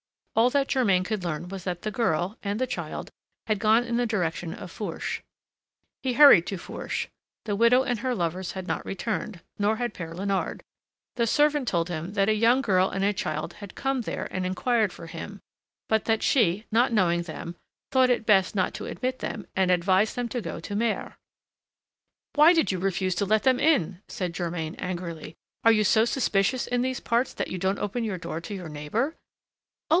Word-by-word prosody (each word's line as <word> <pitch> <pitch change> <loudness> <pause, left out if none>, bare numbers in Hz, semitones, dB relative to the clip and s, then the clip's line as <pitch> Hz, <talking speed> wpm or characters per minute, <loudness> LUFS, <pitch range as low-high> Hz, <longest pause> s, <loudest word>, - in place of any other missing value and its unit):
All 230 +2 +5
that 275 0 +1
Germain 200 -9 +3
could 210 -1 -3
learn 170 0 -3
was 195 -2 -6
that 175 -2 -3
the 215 - -2
girl 195 -3 0
and 200 0 -2
the 255 - +2
child 250 - -5 0.3
had 215 -2 0
gone 220 +3 +4
in 235 -1 -2
the 245 0 +1
direction 175 -5 -2
of 180 - -9
Fourche. 195 -7 -4 0.8
He 260 -2 -1
hurried 260 - +8
to 195 - -3
Fourche: - - -4 0.4
the 205 -2 -1
widow 235 +4 +5
and 245 -4 -1
her 255 +2 -1
lovers 175 0 -2
had 190 -1 -5
not - - -2
returned, 210 -1 -4 0.2
nor 205 +2 +2
had 240 +1 -3
Père 165 -2 -7
Léonard. 195 +1 -2 0.6
The 235 -1 +2
servant 295 +1 +2
told 170 -3 0
him 170 +3 -4
that 200 0 +2
a - - +4
young 230 +4 +4
girl 190 -6 +3
and 195 - -2
a 205 +1 +2
child 155 -2 -3
had 205 -2 -10
come 270 -1 -1
there - - -4
and 185 - -2
inquired 210 +3 +1
for - - -10
him, 170 +5 -8 0.5
but 220 -1 +1
that 225 -1 +1
she, 210 -4 +2
not 240 +3 +3
knowing 175 -5 +2
them, 170 +1 -7 0.4
thought 260 -1 +4
it 240 -2 +1
best 195 -2 +4
not 185 -2 +1
to - - -6
admit 255 0 -3
them 210 -5 -5
and 190 -1 +2
advised 185 +4 +3
them 245 -1 -2
to 245 - -3
go - - -5
to 200 - -5
Mers. 225 +1 -1 1.2
"Why 305 +4 +7
did 325 - +2
you 185 - -2
refuse 185 0 0
to 200 - 0
let 215 +2 +2
them 260 -1 +3
in?" 190 - +2
said 180 -3 -4
Germain 165 -2 -3
angrily. 170 -3 -5 0.3
"Are 230 - +7
you 215 -1 +3
so 220 +2 +4
suspicious 240 -1 +1
in 245 0 0
these 255 0 -2
parts 235 +2 0
that - - -3
you 185 - -4
don't 190 +2 0
open 210 +4 -2
your 210 -4 -2
door 165 -1 -5
to 205 +4 -6
your 180 -4 -7
neighbor?" 150 - -2
"Oh! - - -38
205 Hz, 200 wpm, -26 LUFS, 180-235 Hz, 1.2 s, hurried